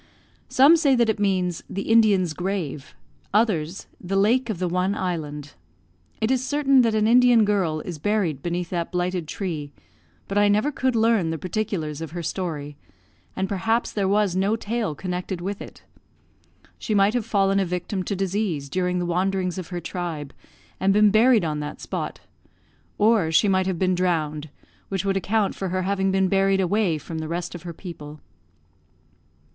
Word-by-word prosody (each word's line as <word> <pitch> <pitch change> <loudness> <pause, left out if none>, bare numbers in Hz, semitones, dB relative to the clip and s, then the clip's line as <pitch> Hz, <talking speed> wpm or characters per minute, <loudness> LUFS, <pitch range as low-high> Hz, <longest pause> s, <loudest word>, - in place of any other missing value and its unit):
Some 285 +6 +6
say 280 -4 +3
that 235 -2 +2
it 215 - 0
means 185 -4 0
"the 195 - -4
Indian's 205 -7 +3
grave," 165 -5 -4 0.4
others 190 -6 +1 0.2
"the 185 +2 -2
lake 230 +5 +2
of 215 - -2
the 180 +1 -1
one 180 +3 0
island." 150 -6 -4 0.7
It 220 +3 0
is 260 -1 +1
certain 275 -1 +3
that 230 -2 +1
an 215 0 +2
Indian 240 -1 +5
girl 185 -7 0
is 170 -2 -7
buried 185 -5 0
beneath 175 0 -3
that 170 -2 -2
blighted 180 -2 -2
tree; 155 -6 -4 0.6
but 200 +1 0
I 205 - +5
never 210 +8 +2
could 260 -3 0
learn 225 -6 +2
the 160 - -2
particulars 165 -4 -3
of 160 -1 -6
her 175 -1 -4
story, 150 -5 -4 0.6
and 190 0 -1
perhaps 225 +5 0
there 200 -2 -1
was 200 -2 +2
no 195 +3 +1
tale 220 -6 -3
connected 180 +2 -4
with 195 +3 -4
it. - - -11 1.0
She 215 - -2
might 200 +1 +4
have 245 -2 0
fallen 195 -3 +2
a - - +2
victim 180 +2 -3
to 200 - -2
disease 190 -6 -2
during 180 +3 -1
the 175 - -1
wanderings 185 +1 -1
of 180 - -6
her 175 -2 -4
tribe, 165 -5 -5 0.5
and 195 - +3
been 210 0 +5
buried 220 -2 +4
on 150 -1 -2
that 150 0 -6
spot; - - -5 0.8
or 210 -6 +3
she 185 +6 +4
might 190 -1 +2
have 185 -2 -1
been 185 +1 +1
drowned, 160 -4 -1 0.4
which 195 -1 -2
would 195 -1 +1
account 200 +1 0
for 190 - -4
her 185 +1 -1
having 195 0 0
been 190 0 +2
buried 195 0 +2
away 190 -2 +1
from 160 +2 -6
the 160 - -4
rest 170 +2 -4
of 175 - -8
her 170 -1 -7
people. 155 -4 -9
190 Hz, 180 wpm, -24 LUFS, 170-210 Hz, 1.0 s, Some